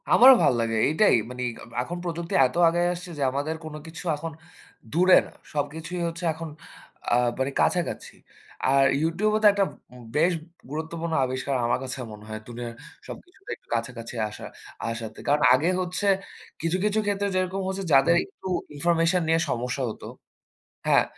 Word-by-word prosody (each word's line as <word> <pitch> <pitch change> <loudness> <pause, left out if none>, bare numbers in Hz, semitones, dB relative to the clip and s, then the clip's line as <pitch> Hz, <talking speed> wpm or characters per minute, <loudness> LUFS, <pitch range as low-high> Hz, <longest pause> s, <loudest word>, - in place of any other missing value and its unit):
আমারও 260 +2 +9
ভাল - - +5
লাগে। 115 -1 0
এইটাই 160 +9 +4
মানি 125 0 -5 0.2
আ - - -10 0.2
এখন 170 +8 -5
প্রযুক্তি 170 -1 -4
এত 125 - -2
আগাই 175 +1 +1
আসছে 180 +1 -8
যে 140 - -1
আমাদের 145 +4 -2
কোনো 155 -1 -6
কিছু 160 +1 -8
এখন 165 +3 -6 0.6
দূরে 180 +3 +6
না। - - -15 0.2
সবকিছুই 155 +4 -3
হচ্ছে 165 +1 -6
এখন 160 +1 -7 0.6
আ - - +6 0.2
মানে 130 +1 0
কাছাকাছি। 175 -2 0 0.5
আর 135 +1 +5 0.2
YouTube 170 +7 +1
ও - - +2
তো - - +9
একটা 200 0 +2 0.3
উম 125 -1 -12
বেশ 165 +4 +4 0.4
গুরুত্বপূর্ণ 160 +2 -4
আবিষ্কার 130 +2 -2
আমার 120 - +1
কাছে 130 +1 -5
মনে 105 0 -11
হয়। 110 0 -5
দুনিয়ার 120 -1 -6 0.3
সবকিছুতে 380 +2 -12
একটু - - -33
কাছাকাছি 115 0 -5
আসা 105 - -9 0.4
আসাতে। 115 -1 -6
কারণ 145 +1 +3
আগে 150 +7 +3
হচ্ছে 180 +3 -2 0.5
কিছু, 165 +3 0
কিছু 210 +1 +2
ক্ষেত্রে 200 0 0
যেরকম 185 +1 0
হচ্ছে 190 +1 -3
যাদের 135 +5 +6
একটু 190 - -11 0.3
ইনফরমেশন 170 +3 +2
নিয়ে 165 +1 +3
সমস্যা 125 +2 -2
হতো 110 - -8 0.8
হ্যাঁ, - - +5
160 Hz, 165 wpm, -26 LUFS, 130-180 Hz, 0.8 s, আমারও